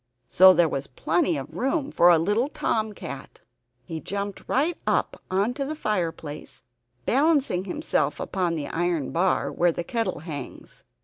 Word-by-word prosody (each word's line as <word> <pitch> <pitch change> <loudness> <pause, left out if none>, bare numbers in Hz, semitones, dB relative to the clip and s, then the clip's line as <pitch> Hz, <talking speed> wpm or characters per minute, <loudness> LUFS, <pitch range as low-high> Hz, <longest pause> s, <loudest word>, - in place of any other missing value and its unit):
So 190 +6 +8
there 175 -2 +4
was 140 -2 -3
plenty 165 +4 0
of 135 +3 -7
room 270 - -1
for 175 - +5
a 170 - +7
little 205 - +1
Tom 220 -6 -1
Cat. - - -9 0.4
He 165 -3 -5
jumped 200 +3 -4
right 310 +6 +1
up - - 0
into 220 +9 0
the 300 +3 -4
fireplace, 165 - -4 0.4
balancing 275 - +2
himself 150 -5 -1
upon 180 -3 -1
the 150 -3 -3
iron 170 -4 -1
bar 180 +3 +1
where 175 0 +2
the 170 - -4
kettle 225 -4 -2
hangs. 150 -5 -8
180 Hz, 150 wpm, -25 LUFS, 165-225 Hz, 0.4 s, So